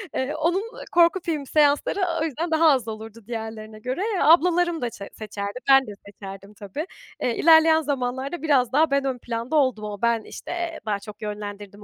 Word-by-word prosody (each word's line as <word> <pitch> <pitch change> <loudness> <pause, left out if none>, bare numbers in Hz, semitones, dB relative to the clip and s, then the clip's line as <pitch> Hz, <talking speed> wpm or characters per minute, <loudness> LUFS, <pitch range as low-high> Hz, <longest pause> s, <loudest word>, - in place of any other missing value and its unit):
Eee, 275 +4 -1
onun 345 +6 0 0.3
korku 340 +2 +4
filmi 305 -4 -2
seansları 295 +5 +2 0.2
o - - +2
yüzden 320 +3 -3
daha 320 0 +5
az 255 -5 0
olurdu 220 +1 -8
diğerlerine 220 -2 -6
göre. 255 - -3 0.2
E - - -1
ablalarım 340 +1 +4
da 240 - -1
şe 200 -2 -10
seçerdi. 205 +1 -6
Ben 270 -2 +6
de - - -6
seçerdim 195 0 -10
tabii. 205 - -6 0.4
Eee, 240 - 0
ilerleyen 320 0 +6
zamanlarda 270 +2 -3
biraz 270 -6 +2
daha 300 +1 +3
ben 275 0 +1
ön 260 -2 -1
planda 235 +4 -4
oldum 255 -7 +2
ama. 205 0 -6
Ben, 235 -1 +2
işte, - - -9
eee, 345 -1 -4
daha 205 -2 -1
çok 210 +1 -12
yönlendirdim 205 -1 -7
255 Hz, 190 wpm, -24 LUFS, 215-315 Hz, 0.4 s, Ben